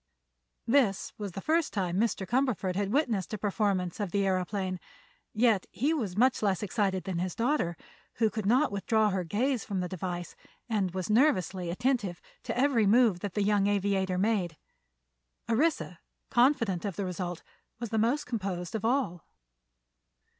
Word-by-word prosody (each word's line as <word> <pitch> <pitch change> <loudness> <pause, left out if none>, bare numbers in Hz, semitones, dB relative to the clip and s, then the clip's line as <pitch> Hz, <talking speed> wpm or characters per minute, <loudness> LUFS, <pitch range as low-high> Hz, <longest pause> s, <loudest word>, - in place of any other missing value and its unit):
This 230 -5 +2
was 200 -4 -5
the 195 - -5
first 320 - +1
time 185 -2 -1
Mr. 215 -3 0
Cumberford 220 -5 0
had 200 0 -1
witnessed 225 - 0
a - - -5
performance 200 -3 -1
of 205 -3 -1
the 200 +2 0
aëroplane, 185 0 -1 0.5
yet 220 -3 +2
he 290 +7 0
was 210 - -3
much 250 +2 +3
less 200 -2 +1
excited 195 -2 0
than 185 -3 -3
his 180 -1 -2
daughter, 230 - 0 0.4
who 220 -2 +2
could 215 -1 -3
not 260 +5 +3
withdraw 210 +1 +1
her 185 -1 -1
gaze 235 - 0
from 195 -3 -3
the 180 - -1
device 175 -1 -5 0.3
and 200 -6 -1
was 185 +2 -2
nervously 190 - +2
attentive 205 -3 0 0.2
to - - -4
every 250 -5 +3
move 220 -4 +4
that 200 0 -5
the 205 - +1
young 200 -1 +2
aviator 195 -2 +1
made. 185 -5 0 0.9
Orissa, 235 - 0 0.3
confident 240 - +3
of 200 -4 -3
the 200 - -2
result, 180 -1 -4 0.4
was 235 -2 -5
most 230 +7 +1
composed 190 -7 -4
of 220 - -3
all. 230 - 0
205 Hz, 160 wpm, -29 LUFS, 185-235 Hz, 0.9 s, move